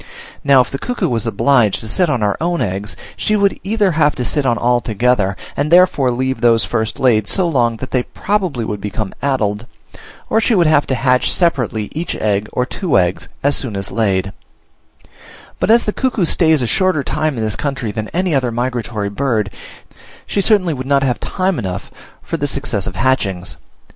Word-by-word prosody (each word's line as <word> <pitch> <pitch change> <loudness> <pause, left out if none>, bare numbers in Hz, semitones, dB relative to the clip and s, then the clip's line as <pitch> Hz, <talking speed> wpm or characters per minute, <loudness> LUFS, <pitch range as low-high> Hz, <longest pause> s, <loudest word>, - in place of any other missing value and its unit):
Now, 140 -3 +6
if 125 - -3
the 135 - -4
cuckoo 245 -1 -2
was 115 -2 -1
obliged 115 -3 +2
to 110 - -4
sit 170 +10 +1
on 130 -6 0
her 105 -1 +1
own 170 +1 0
eggs, 100 +2 -3 0.2
she 215 - 0
would 200 -1 +1
either 205 -1 +1
have 150 -2 +2
to 125 - -3
sit 145 +2 0
on 120 -2 +2
all 120 0 +2
together, 110 -3 +1 0.2
and 145 +2 -1
therefore 175 -6 +4
leave 130 0 -2
those 115 -2 +4
first 110 0 -2
laid 110 -6 +2
so 185 -3 +2
long, 120 -7 +1
that 130 +3 -7
they 130 - +2
probably 180 - -2
would 105 -2 -4
become 105 -1 -4
addled; 115 -5 -1 0.6
or 220 - +2
she 230 - +2
would 175 -3 +4
have 155 -2 +3
to 130 - 0
hatch 125 0 +2
separately 125 - 0
each 165 +3 -4
egg, 105 0 -1
or 125 - 0
two 165 - -1
eggs, 90 -1 0
as 145 +1 +3
soon 120 -7 -2
as 100 0 -4
laid: 100 -3 0 1.3
but - - 0
as 235 +1 +5
the 210 - -2
cuckoo 250 -8 0
stays 160 -4 +3
a - - +1
shorter 185 0 +1
time 155 -2 -1
in 110 - -2
this 110 -1 -1
country 130 -6 -3
than 110 0 -4
any 180 0 -1
other 130 -3 +1
migratory 120 -3 -2
bird, 110 -3 -1 0.7
she 200 - -1
certainly 190 -5 +2
would 130 -1 -6
not 140 0 +3
have 125 -3 0
time 185 -2 -1
enough 90 -2 -5 0.3
for - - -3
the 145 - -1
successive 115 -10 -2
hatchings. 95 -5 0
130 Hz, 195 wpm, -17 LUFS, 110-160 Hz, 1.3 s, Now